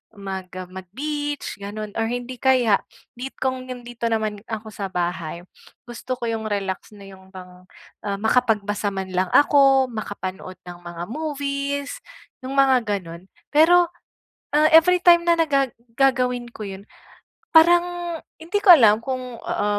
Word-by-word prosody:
mag 190 -2 -6
ah, 185 -1 -6
mag-beach 290 +12 -5
ganun, 210 +1 -6
or 225 - +1
hindi 245 +1 -5
kaya 250 -6 +4 0.4
need 265 +1 -6
kong 260 -1 -2
yung' 245 -1 -7
dito 235 -1 -3
naman 215 -2 -1
ako 220 -1 -6
sa 200 -1 -4
bahay. 175 -1 -3 0.4
Gusto 240 +2 -5
ko 235 - -4
yung 220 -1 -3
relax 195 -1 -3
na 200 -1 -13
yung 190 0 -16
bang, 180 -1 -12 0.4
ah, 200 - -1
makapagbasa 210 -2 +1
man 190 -1 -5
lang 185 +1 +1
ako, 275 -2 +5
makapanood 190 -4 -6
ng 175 0 -9
mga 175 0 -7
movies, 285 -1 -3 0.5
yung 265 +1 -5
mga 265 -3 +4 0.2
ganun. 170 +1 -11 0.3
Pero, 345 +3 +6 0.7
ah, 305 +1 +5
everytime 345 +1 +6
na 340 -1 +3
na 330 - +4
gaga 275 -2 +2 0.3
gagawin 250 -3 +1
ko 220 - -8
yun, 195 +1 -8 0.7
parang 345 0 +4 0.2
hindi 345 +6 -2
ko 400 - +7
alam 220 -9 +6
kung, 255 -2 -5
ah, 205 0 -1
240 Hz, 150 wpm, -22 LUFS, 200-280 Hz, 0.7 s, ko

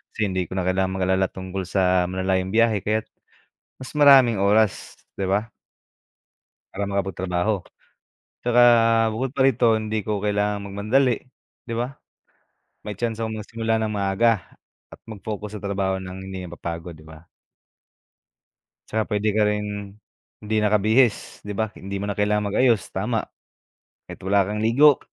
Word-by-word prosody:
Kasi 105 -3 -1
hindi 95 -2 -2
ko 95 - -7
na 95 - -1
kailangang 95 +1 0
mag-alala 95 0 +1
tungkol 95 0 -6
sa 90 -2 +2
malalayong 95 +1 -1
biyahe 115 -2 +3
kaya't 110 +3 -1 0.7
mas 130 - -9
maraming 135 -7 +6
oras, 105 +1 +1 0.2
di 95 -1 -3
ba 105 +4 0 1.2
para 100 - -3
makapagtrabaho 95 0 -1 0.9
tsaka 120 0 +4 0.5
bukod 125 +4 -3
pa 135 - 0
rito 125 -2 +3
hindi 110 0 -2
ko 105 -2 -1
kailangan 105 0 0
magmadali, 110 +6 +1 0.5
di 115 - -4
ba? 120 +3 -2 0.9
May 105 - -4
tsansa 115 0 -2
akong 110 -1 -3
magsimula 115 +1 -2
ng 110 -1 -1
maaga 100 0 0 0.3
at - - -13
mag-focus 105 -1 -6
sa 105 - -13
trabaho 100 -1 -1
ng 95 0 -8
hindi 95 -1 -6
mapapagod, 85 0 -6
di 80 - -16
ba? 80 -1 -13 1.7
Tsaka 110 0 0
pwede 105 0 0
ka 110 - +3
rin, 105 -1 -3 0.4
hindi 110 +1 -3
nakabihis, 110 +3 +2
di 105 - -6
ba? 110 +2 -1
Hindi 100 +1 -6
mo 100 - -3
na 100 - -2
kailangang 105 0 0
mag-ayos, 115 -8 +3
tama. - - 0 0.8
Kahit - - -11
wala 100 0 +4
kang 105 +3 -4
ligo, 130 +6 +5
105 Hz, 145 wpm, -23 LUFS, 95-110 Hz, 1.7 s, maraming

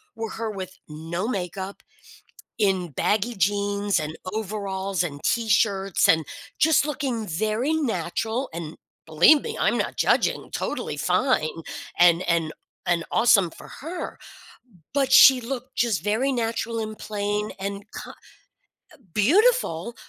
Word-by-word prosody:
were 225 -1 -5
her 225 -1 -4
with 185 -2 -7
no 165 +6 -4
makeup, 190 -2 -4 0.8
in 190 -4 +1
baggy 215 - 0
jeans, 200 0 0
and 155 +1 -5 0.2
overalls, 195 -3 -2
and 145 -5 -5
t-shirts, 210 -4 +2
and 160 -1 +4 0.3
just 310 -1 +3
looking 255 -7 -3
very 215 - -1
natural 225 - -2
and 165 -1 -7 0.3
believe 170 - +5
me, - - -5
I'm - - +2
not - - -2
judging, - - +1
totally - - -3
fine 165 - 0 0.4
and 175 0 +5
and 165 -2 +1 0.4
and 170 -1 +1
awesome 200 -7 +4
for - - -13
her, 335 +5 -6 0.8
but 275 -2 +1
she 260 -1 +9
looked 255 +1 -6
just 225 -9 +1
very 220 +7 +1
natural 230 -1 -2
and 215 -1 -5
plain 210 0 -2
and 200 +1 -4
ki - - -7 0.8
eh, 310 - -18 0.2
beautiful, 240 - +2
205 Hz, 130 wpm, -24 LUFS, 180-235 Hz, 0.8 s, she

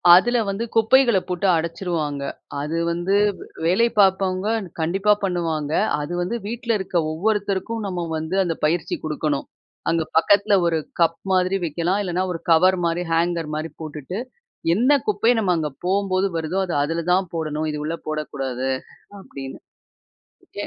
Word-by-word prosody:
அதுல 240 +6 +4
வந்து 200 +3 -2
குப்பைகள 230 -1 +5
போட்டு 180 +2 0
அடச்சிருவாங்க. 160 -4 -2 0.4
அது 155 +3 -2
வந்து, 175 +3 0 0.5
வேலை 205 +8 +4
பாப்பவங்க 190 +1 +3 0.3
கண்டிப்பா 195 +6 +3
பண்ணுவாங்க. 165 -5 -1 0.3
அது 145 +4 -4
வந்து 180 +7 -2
வீட்டுல 235 0 -1
இருக்க 190 -2 -2 0.2
ஒவ்வொருத்தருக்கும் 205 +4 -1
நம்ம 180 -2 -3
வந்து, 160 +4 -3
அந்த 170 -3 -1
பயிற்சி 165 +3 0
குடுக்கணும். 150 -2 -2 0.4
அங்க 165 -1 +1
பக்கத்துல 205 +5 +4
ஒரு 165 -1 +1 0.2
கப் 165 0 +3 0.2
மாதிரி 185 +1 +2
வைக்கலாம். 170 +5 0
இல்லன்னா, 180 0 -1
ஒரு 165 - -6
கவர் 185 +3 +5
மாரி 170 +1 0
ஹேங்கர் 165 -1 0
மாரி 155 0 -4
போட்டுட்டு, 155 +4 -6 0.6
என்ன 245 +8 +3 0.2
குப்பைய 220 +4 +3
நம்ம 190 -5 +2
அங்க 155 -2 -1 0.2
போம்போது 195 0 +1
வருதோ, 165 +4 -1
அத 175 - -3
அதுல 165 +3 -2
தான் 185 0 +2
போடணும். 155 -1 -2
இது 150 - -4
உள்ள 165 +1 -2
போடக்கூடாது 135 -4 -3 0.5
அப்படினு, 135 -7 -9 1.0
எ - - -6
175 Hz, 140 wpm, -22 LUFS, 160-195 Hz, 1.0 s, குப்பைகள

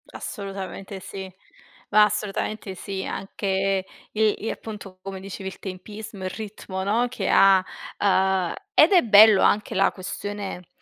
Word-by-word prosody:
Assolutamente 195 -1 -6
sì, 190 0 -8 0.6
ma 210 +1 +6
assolutamente 210 -1 -2
sì, 190 +1 -5
anche 195 0 -1 0.3
il 215 0 +2
i - - -1
appunto, 200 -4 -9
come 195 0 -7
dicevi 190 0 -6
il - - -12
tempismo, 200 +2 -8
il 185 - -2
ritmo, 195 -2 -6
no, 225 +5 +1
che 205 -6 -3
ha 195 -1 +6 0.3
uhm, 190 -2 +2 0.2
ed 340 -2 +7
è 365 -3 +7
bello 215 -2 +7
anche 210 0 +2
la - - +3
questione, 195 -1 -6
195 Hz, 140 wpm, -24 LUFS, 190-210 Hz, 0.6 s, ed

